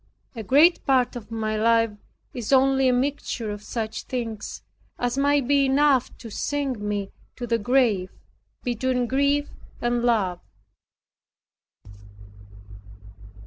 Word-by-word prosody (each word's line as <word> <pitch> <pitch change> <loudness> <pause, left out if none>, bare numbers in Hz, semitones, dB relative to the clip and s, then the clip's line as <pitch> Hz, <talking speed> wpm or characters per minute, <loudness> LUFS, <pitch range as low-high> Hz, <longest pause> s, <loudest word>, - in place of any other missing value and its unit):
A 225 - -5
great 295 - +4
part 255 -3 +2
of 225 -3 -8
my 220 -1 -2
life 230 +1 +3 0.4
is 240 -1 -5
only 270 0 +4
a - - +4
mixture 250 -3 -2
of 205 0 -6
such 220 0 -4
things 230 -5 -5 0.3
as 245 0 -1
might 280 -1 +2
be 280 -1 +3
enough 270 -1 +3
to 230 - -10
sink 275 -1 -2
me 205 -1 -3 0.2
to 245 - -5
the 230 -1 0
grave 220 -5 +2 0.5
between 250 +1 0
grief 280 +3 +1 0.3
and 240 0 0
love. 200 -7 +1
245 Hz, 120 wpm, -24 LUFS, 220-270 Hz, 0.5 s, great